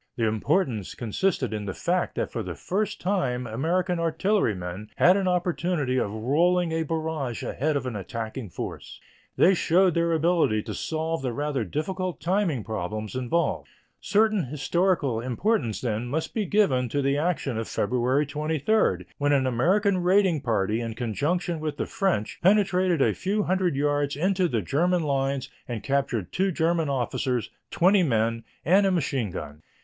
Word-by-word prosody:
The 115 - 0
importance 110 - 0
consisted 130 - -1
in 105 -1 -3
the 95 - -4
fact - - -1
that - - -2
for - - -3
the - - -5
first 205 +3 -2
time 135 -11 -1
American 170 - 0
artillerymen 110 - -1
had 180 +2 +5
an 195 -2 0
opportunity 175 -6 0
of 105 - -1
rolling 165 +10 +1
a 160 0 0
barrage 160 -6 -3
ahead 150 +3 -1
of 140 - -4
an 125 -3 -4
attacking 110 +3 -5
force. - - -7 0.4
They 190 - +6
showed 180 +1 +3
their 170 +1 +1
ability 160 -10 +2
to - - -5
solve 160 -1 -2
the 130 -2 -2
rather 145 -1 -2
difficult 180 - -3
timing 175 - 0
problems 110 +1 -4
involved. 130 +7 -1 0.3
Certain 215 -4 +2
historical 145 -1 0
importance, 125 - -1
then, 115 -1 -2
must 155 +6 -3
be 215 -4 -1
given 135 - +2
to 140 +4 -1
the 140 +1 +1
action 150 -8 -1
of 115 - -4
February 125 +6 +1
23, 150 - 0
when 145 0 +2
an 135 -2 +3
American 185 - +2
raiding 180 -3 +3
party 110 -3 0
in 115 -1 -4
conjunction 150 - -1
with 155 -1 -3
the - - -1
French 180 - -1
penetrated 185 -4 +3
a - - +2
few 205 +3 -1
hundred 185 -4 +1
yards 145 0 0
into 185 +4 +1
the 115 - -1
German 175 - +1
lines 135 -2 -1 0.2
and 115 -3 -5
captured 130 -9 -1
two 190 +1 +1
German 165 -2 +1
officers, 125 -2 -1 0.2
twenty 190 +3 +4
men, 115 -6 +1 0.2
and 195 +5 +5
a - - +2
machine 140 - 0
gun. 75 -3 -7
145 Hz, 160 wpm, -26 LUFS, 120-180 Hz, 0.4 s, They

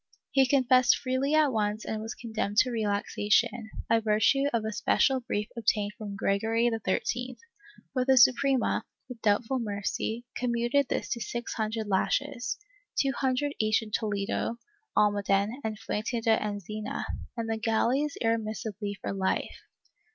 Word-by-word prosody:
He 270 -1 +4
confessed 255 -2 +4
freely 265 +3 0
at 305 -3 +4
once 210 0 -1
and 215 -1 -3
was 225 +1 -5
condemned 220 -3 -3
to 250 +2 +5
relaxation, 210 0 +1 0.2
by 230 - +4
virtue 220 +5 +3
of 230 -2 0
a 220 - -2
special 260 +5 +2
brief 210 -4 -3
obtained 210 -3 0
from 205 -2 -6
Gregory 225 +4 +1
XIII, 240 +3 -2 0.6
but 255 -1 0
the 265 0 +5
Suprema, 260 +2 +4 0.2
with 250 -3 -9
doubtful 220 +5 +1
mercy, 220 +2 -3
com 245 -1 -1
muted 240 +4 +2
this - - -2
to 235 - -2
six 235 +2 -4
hundred 220 0 -2
lashes 245 +5 0 0.2
— - - -8
two 275 - +3
hundred 270 +2 0
each 215 0 +2
in 215 - -10
Toledo, 210 +2 -1 0.4
Almaden 205 -1 +3
and 220 -1 -3
Fuente 225 +2 -2
de 225 -1 +3
Enzina 210 0 -4 0.2
— - - -14
and 230 -1 -2
the 225 0 -1
galleys 245 +6 +1
irremissibly 215 -2 -2
for - - -4
life. 190 -1 -1
225 Hz, 150 wpm, -28 LUFS, 210-250 Hz, 0.6 s, to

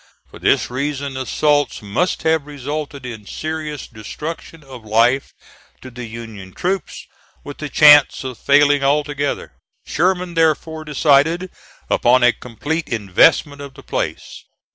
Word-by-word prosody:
For - - -12
this - - +1
reason 140 +1 -3
assaults 145 0 0
must 105 - -1
have 160 -2 +1
resulted 145 -1 -6
in 110 -5 -8
serious 155 0 -5
destruction 150 +8 -8
of 130 -4 -12
life 115 +5 +2 0.5
to 130 - -10
the 125 0 -8
Union 110 -4 -9
troops, 190 +2 -3 0.4
with 145 - -9
the 150 - -5
chance 145 -1 +6
of 130 -3 -7
failing 145 0 +4
altogether. 145 0 -1 0.3
Sherman 180 +2 0
therefore 160 -1 0
decided 155 +4 +2 0.4
upon 125 +1 +3
a 120 -1 +5
complete 125 +8 -5
investment 115 +7 +2
of 140 -2 -10
the - - -13
place. - - -5
145 Hz, 130 wpm, -19 LUFS, 125-155 Hz, 0.5 s, chance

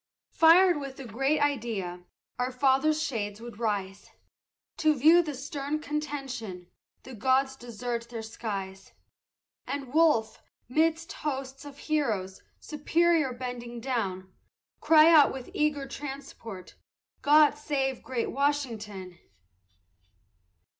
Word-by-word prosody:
Fired 340 0 +6
with 275 -2 -7
the 270 - -8
great 270 +7 0
idea, 220 -11 -2 0.3
our 250 +1 0
Fathers' 275 +4 +2
shades 210 -8 -3
would 235 -2 -10
rise, 200 -4 -3 0.7
To 310 -1 +3
view 320 +6 +6
the 305 -4 -5
stern 285 +2 -4
contention, 275 -12 -5 0.3
the 260 - -10
gods 265 +3 +1
desert 240 -1 -5
their 230 -2 -6
skies; 195 -4 -6 0.7
And 275 -2 -5
Wolfe, 305 -9 +3 0.3
'midst 325 - 0
hosts 270 -1 -5
of 285 -1 -10
heroes, 220 -12 -2 0.2
superior 320 -1 +1
bending 240 -1 -6
down, 195 -7 -3 0.5
Cry 315 -1 +6
out 305 -3 +7
with 260 -2 -8
eager 295 -2 0
transport, 270 -9 -8 0.5
God 300 +1 +6
save 270 -3 -2
great 250 -3 -3
Washington! 220 -11 -2
265 Hz, 110 wpm, -28 LUFS, 225-295 Hz, 0.7 s, out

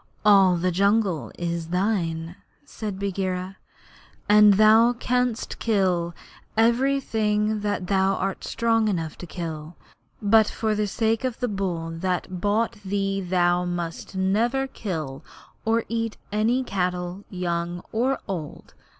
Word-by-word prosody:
'All 195 -3 +6
the 180 +2 0
jungle 195 - +1
is 170 -1 -3
thine,' 175 -3 -1 0.3
said 215 -8 -6
Bagheera, 190 -1 -3 0.7
'and 210 -1 +7
thou 220 +3 +6
canst 250 -1 -1
kill 180 -6 +1 0.4
everything 225 -3 +2
that 205 -2 -2
thou 195 +1 +2
art 195 0 -3
strong 225 -1 +1
enough 165 -6 -2
to 180 - -8
kill; 160 -1 -6 0.4
but 215 +1 +4
for 220 -1 -1
the 210 0 0
sake 225 +3 0
of 255 -2 -2
the 245 - 0
bull 180 -6 -3
that 180 +1 -3
bought 225 +3 +1
thee 195 0 -1
thou 175 -1 +2
must 175 +1 -4
never 225 +8 +1
kill 160 - -5 0.4
or 225 +1 +1
eat 230 -1 -2
any 225 +5 +1
cattle 180 -2 -2
young 175 -1 -3
or 255 +4 +1
old. 165 -7 -6
195 Hz, 125 wpm, -24 LUFS, 175-220 Hz, 0.7 s, and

